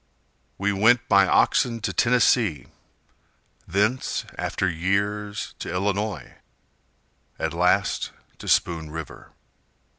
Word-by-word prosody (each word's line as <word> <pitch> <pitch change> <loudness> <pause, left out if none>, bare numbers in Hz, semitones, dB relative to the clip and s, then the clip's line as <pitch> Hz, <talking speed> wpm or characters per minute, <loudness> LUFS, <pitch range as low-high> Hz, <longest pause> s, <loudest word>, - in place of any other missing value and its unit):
We 100 +1 0
went 120 +5 +3
by 100 -3 +5
oxen 115 +6 +2
to 115 - -2
Tennessee, 120 - +2 1.0
Thence 105 +8 0
after 95 - -2
years 100 +4 -2
to - - -5
Illinois, 100 -1 -2 1.0
At - - -2
last - - +1 0.3
to - - -9
Spoon 80 -2 +1
River. 80 0 -8
100 Hz, 95 wpm, -24 LUFS, 90-110 Hz, 1.0 s, by